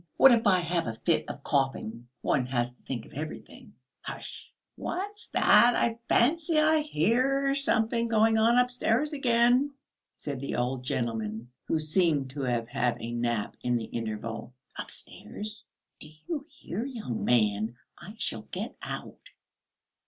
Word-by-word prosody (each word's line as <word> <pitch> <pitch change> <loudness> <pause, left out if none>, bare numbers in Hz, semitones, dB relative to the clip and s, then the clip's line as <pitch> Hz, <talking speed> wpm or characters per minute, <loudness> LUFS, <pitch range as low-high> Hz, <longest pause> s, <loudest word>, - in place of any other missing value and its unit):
What 270 - +9
if 230 -2 +4
I 190 -2 +6
have 170 -3 -1
a 115 - -3
fit 165 +8 0
of - - -7
coughing? 130 -4 -1
One 125 -2 +1
has 120 -1 -1
to - - -29
think 120 -4 -5
of - - -16
everything." 150 +3 -8 0.3
"Hush!" - - -7 0.2
"What's 410 +4 -4
that? 240 0 +5
I 230 0 +1
fancy 315 +6 +3
I 310 +1 +4
hear 275 - +2
something 235 -5 +1
going 220 0 +4
on 230 +2 +4
upstairs 250 +3 +2
again," 250 +1 +3 0.4
said 140 -3 -5
the 140 - -3
old 125 +1 -1
gentleman, 115 -1 -2 0.2
who - - +1
seemed 155 -4 +1
to 140 +1 -5
have 120 -3 0
had 120 0 0
a 115 - -5
nap 120 -3 -1
in 125 0 +1
the 115 -2 -1
interval. 115 +2 -5 0.2
"Upstairs?" 215 +1 -5 0.3
"Do 155 - -9 0.2
you 300 -4 -3
hear, 230 - -5
young 230 - -4
man? 110 -1 +2 0.2
I 190 +5 -11
shall - - -2
get - - -5
out." - - -7
170 Hz, 150 wpm, -28 LUFS, -, 0.4 s, What